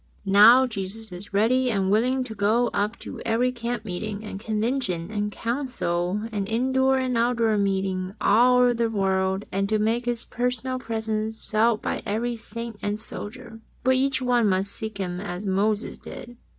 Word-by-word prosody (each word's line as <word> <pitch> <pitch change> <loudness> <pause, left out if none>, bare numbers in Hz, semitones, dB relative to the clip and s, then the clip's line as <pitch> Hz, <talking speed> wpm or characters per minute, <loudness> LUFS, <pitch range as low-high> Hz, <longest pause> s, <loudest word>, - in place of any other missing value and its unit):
'^ - - -37 0.3
Now 230 +6 +8
Jesus 220 -1 -5
is 180 +3 -7
ready 245 +6 +2
and 195 -4 +1
willing 250 +5 +2
to 240 -3 -7
go 220 +4 +2
up 205 +3 -1
to - - -7
every 235 +2 +1
camp 235 -2 -4
meeting 205 +2 -4
and 205 -2 -6
convention 215 -5 -1
and 210 -1 -2
council 210 -7 -2
and 200 -2 -2
indoor 260 +3 +2
and 255 -1 -1
out 235 +1 +2
door 225 -2 +2
meeting 190 -1 -1
all 250 +3 +5
over 245 -1 +4
the 230 -1 0
world, 190 -1 0
and 195 +1 -1
to 215 - +2
make 225 +3 0
His 240 -1 -2
personal 250 +1 -1
presence 220 -1 -3
felt 220 +1 +2
by - - -2
every 235 +4 -1
saint 230 0 -6
and 205 +1 -2
Soldier, 225 +1 -8 0.2
but 260 +1 +4
each 265 0 +1
one 240 -4 +3
musk 190 +1 +1
seek 220 -2 -5
Him 180 -2 -3
as 195 0 -5
Moses 205 +3 0
did. 240 0 -9
220 Hz, 175 wpm, -25 LUFS, 200-240 Hz, 0.3 s, Now